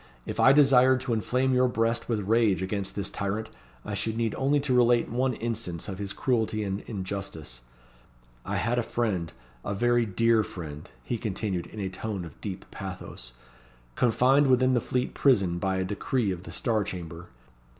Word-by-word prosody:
If - - -5
I 135 - +7
desired 130 -2 +6
to 130 -3 -1
inflame 125 +4 +1
your 125 0 +4
breast 115 0 0
with 110 -3 0
rage 110 -4 +3
against 95 0 -3
this 100 -1 -3
tyrant, 105 +3 -3 0.3
I - - -4
should 110 0 -2
need 115 -2 0
only 140 +2 +2
to 140 -2 0
relate 120 -1 +4
one 125 +1 +1
instance 110 -8 -4
of 95 -2 -6
his 100 -1 -3
cruelty 110 -3 0
and 100 -1 -2
injustice. 95 - -5 0.8
I - - -3
had 120 +2 +1
a - - +3
friend 105 -8 -1 0.3
a 100 - -3
very 120 +2 +2
dear 115 +3 +3
friend," 75 -6 -8
he 115 - -3
continued, 100 -4 -3
in 110 - -10
a 95 - -1
tone 95 0 -4
of 80 - -13
deep 95 -2 -5
pathos 90 -10 -7 0.6
"confined 130 - +4
within 130 0 +4
the 120 - +2
Fleet 125 +2 -1
Prison 95 -11 +3
by 95 +1 0
a 95 - 0
decree 105 +3 -1
of 90 0 -6
the - - -8
Star 110 -4 0
Chamber. 90 -3 -7
110 Hz, 180 wpm, -27 LUFS, 95-120 Hz, 0.8 s, I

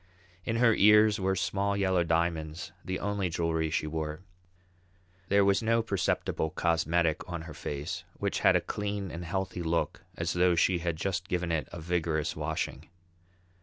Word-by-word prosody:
In 115 - -1
her 115 -1 +5
ears 105 +1 +6
were 95 0 +1
small 100 +2 0
yellow 95 -3 +2
diamonds, 80 -1 -1
the 95 0 -3
only 100 -2 -1
jewellery 80 -1 0
she 75 - -1
wore. 75 +1 -4 1.1
There 100 0 +4
was 100 +2 +3
no 115 0 +2
perceptible 95 -6 -1
cosmetic 85 -1 +1
on 85 -2 -4
her 80 -2 -9
face, 75 +1 -5
which - - -1
had - - +5
a - - +3
clean 100 -2 -3
and 85 +1 -6
healthy 95 +1 -3
look 85 0 -1
as - - -1
though 90 0 +3
she 90 +1 +3
had 85 -1 -1
just 90 +2 -2
given 90 -2 -1
it 80 -2 -1
a - - -7
vigorous 80 -2 -1
washing. - - -3
90 Hz, 165 wpm, -29 LUFS, 80-100 Hz, 1.1 s, ears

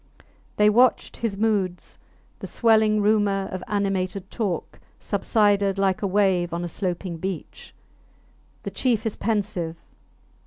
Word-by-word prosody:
They 210 - +5
watched 240 +4 +3
his 220 -4 -2
moods; 200 -5 -1 0.4
the - - -6
swelling 220 -2 +3
rumour 205 -2 +2
of 185 -1 -5
animated 195 -2 -2
talk 205 -7 -3 0.2
subsided 205 -2 +1
like 195 -1 +1
a 200 - 0
wave 185 -3 +1
on 170 - -3
a - - -2
sloping 175 0 -4
beach. 185 0 -6 0.9
The - - -5
chief 235 -4 0
is 220 - -1
pensive. 195 -7 -2
200 Hz, 125 wpm, -24 LUFS, 185-215 Hz, 0.9 s, They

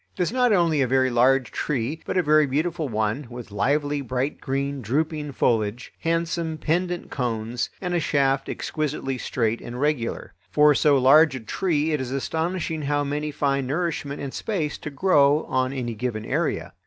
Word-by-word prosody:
It - - -2
is 175 - -1
not 250 -1 +3
only 170 -7 +3
a 130 - +2
very 130 0 +2
large 125 0 +3
tree 145 +3 -2
but - - -1
a 180 - +3
very 155 -1 +4
beautiful 155 +2 -1
one, 110 +5 -1
with 120 -3 -9
lively 145 +8 0
bright 130 +2 -2
green 140 0 -2
drooping 150 +5 -1
foliage, 115 -1 0
handsome 165 -1 -1
pendent 175 +3 -1
cones, 120 -1 -2
and 180 -2 -3
a 175 - +2
shaft 140 -3 +1
exquisitely 140 -4 -3
straight 115 -3 -1
and 120 +1 -7
regular. 145 -5 -1 0.2
For 150 0 +5
so 145 0 +4
large 135 +3 +6
a - - -4
tree 155 - -1
it 150 -3 0
is 130 - -4
astonishing 160 +5 -2
how 145 0 0
many 145 +2 -2
find 140 -2 0
nourishment 150 -1 -2
and 135 - -5
space 165 -9 -2
to - - -6
grow 145 -2 +3
on 130 0 0
any 125 -3 -3
given 110 -1 -3
area. - - -1
140 Hz, 175 wpm, -24 LUFS, 125-155 Hz, 0.2 s, large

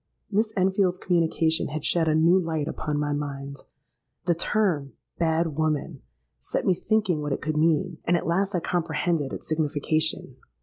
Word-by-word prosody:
Miss 215 +2 +1
Enfield's 190 -1 +2
communication 165 -2 +1
had 150 +1 -5
shed 165 -2 +3
a 155 - +3
new 170 +4 +5
light 160 -4 -2
upon 150 -2 -3
my 145 0 0
mind. 140 -1 -5 0.7
The 175 - +3
term 170 -5 0 0.3
'bad 165 -2 +1
woman' 155 -1 -1 0.4
set - - -2
me 185 - +4
thinking 195 -4 0
what 145 -1 -2
it - - -3
could 155 0 -1
mean; 155 0 +1
and 175 +1 +3
at - - -4
last 190 +3 0
I 175 - 0
comprehended 165 -3 -1
its - - -6
signification. 155 -2 -1
160 Hz, 165 wpm, -26 LUFS, 150-175 Hz, 0.7 s, new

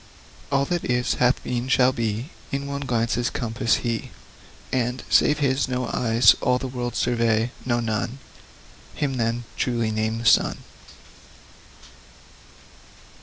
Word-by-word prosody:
All 140 0 +2
that 175 +3 -2
is, 125 0 0
hath 125 +1 +3
been, 125 0 -2
shall 130 -1 +4
be, 115 - -3 0.2
In 140 0 -2
one 140 0 -4
glance's 120 -2 0
compass, 115 0 0
He 115 -1 -2
Limitless - - -20
descries; - - -23
And, 125 +1 -5
save 150 - +4
His, 135 -2 +1
no 125 -1 -2
eyes 115 -3 +5
All 125 - +2
the 130 - -4
world 120 -2 -4
survey 115 -1 +1 0.2
no, 120 -1 +2
none! 115 +2 -2 0.8
Him, 140 -3 -1
then, 115 0 -1
truly 115 -3 0
name 110 +1 -1
the 115 - -6
Sun. - - +4
120 Hz, 140 wpm, -24 LUFS, 115-130 Hz, 0.8 s, eyes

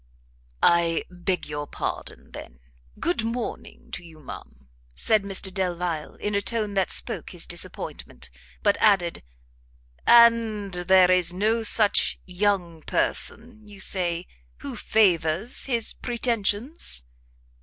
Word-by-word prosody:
"I 170 -1 +3
beg 180 0 -2
your 145 0 -5
pardon, - - -5
then; 60 +1 -10 0.4
good 345 -9 0
morning 230 +2 -5
to - - -5
you, 160 -2 -14
ma'am," 65 - -11 0.3
said 220 - +2
Mr 195 -1 -3
Delvile, 175 -4 -2
in 210 - -4
a 200 - +1
tone 215 -1 -2
that 195 -1 +1
spoke - - -1
his - - -2
disappointment; 60 -1 -6 0.3
but - - +3
added 190 -5 +3 0.9
"And 230 -4 +5
there 180 +1 +4
is 180 -2 +4
no 215 +5 +1
such 215 -1 +4
young 180 -3 -1
person, 225 +6 -3
you 205 -1 -13
say, 175 -2 -1 0.4
who - - -6
favours 185 0 +2
his 235 -4 0
pretensions?" 235 - -1
195 Hz, 120 wpm, -25 LUFS, 170-220 Hz, 0.9 s, And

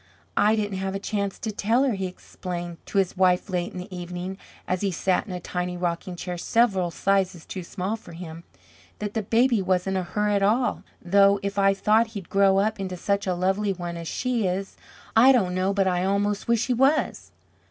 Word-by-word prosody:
"I 215 +1 +4
didn't 205 -3 -2
have 190 0 -3
a - - -2
chance 200 -1 -2
to 220 - -4
tell 225 +5 +2
her," 270 -4 +2
he 190 -2 -2
explained 175 -1 -7
to - - -3
his 190 -2 +2
wife 185 +1 +2
late 180 -1 -1
in - - -9
the 180 +1 -7
evening, 180 +2 -6 0.3
as 185 0 -1
he 200 - +1
sat 185 +2 0
in - - -7
a 180 - -4
tiny 180 0 -3
rocking 175 +1 -3
chair 175 0 -5
several 195 -5 +2
sizes 190 -1 0
too 185 - -6
small 185 +4 -3
for 205 -6 -12
him, 165 -1 -8 0.5
"that 210 -1 -4
the 225 - 0
baby 230 +2 +2
wasn't 185 +1 0
a - - +1
her 210 +4 -1
at 200 -1 +2
all, 230 +5 +2 0.2
though 200 +2 +5
if 200 0 -2
I 195 0 +4
thought 215 +4 +3
he'd 190 - -8
grow 195 -1 +4
up 210 +1 +1
into 185 -2 -4
such 200 +2 -1
a 180 - +1
lovely 195 +3 +1
one 175 -2 -5
as 170 -1 -6
she 245 -2 -1
is, 190 +2 -3 0.4
I 245 +4 +8
don't 195 -9 +2
know 185 +1 +1
but 200 -1 +1
I 180 -1 +1
almost 200 +1 0
wish 235 0 +2
he 250 - +1
was." 270 +5 +1
195 Hz, 215 wpm, -25 LUFS, 180-210 Hz, 0.5 s, I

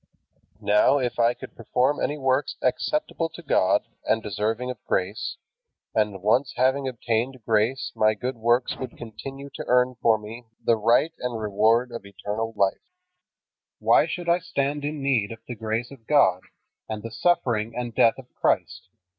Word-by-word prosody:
Now, 105 +7 +4
if 125 -3 -2
I 120 +1 +4
could - - -11
perform 125 +5 +1
any 150 - -1
work 135 0 +1 0.2
acceptable 165 - 0
to 170 +2 -12
God 95 - +3 0.2
and 110 0 +1
deserving 110 +5 -2
of 120 - -11
grace, 95 +3 -1 0.6
and 105 -3 0
once 125 +6 +2
having 130 +2 +2
obtained 120 0 -2
grace 115 +4 +1
my 110 0 +3
good 125 +4 -3
works 120 +2 +1
would 130 - -7
continue 135 +5 -8
to - - -5
earn 125 +1 +3
for 115 -1 +4
me 110 +3 -9
the 115 - +3
right 120 +9 +3
and 125 -2 -3
reward 110 +4 +2
of 115 -3 -6
eternal 105 +3 -4
life, 100 -1 0 0.9
why - - +4
should 175 -1 -5
I 170 +1 +4
stand 145 -4 -2
in 145 -1 -3
need 120 -7 +1
of 115 -1 -10
the 125 - -4
grace 110 +2 -3
of 120 -5 -14
God 95 -12 +4 0.5
and 110 -1 -4
the 115 - -6
suffering 115 -6 +1
and 120 -1 -4
death 115 - +4
of 130 -2 -13
Christ? - - -1
120 Hz, 165 wpm, -25 LUFS, 110-135 Hz, 0.9 s, Now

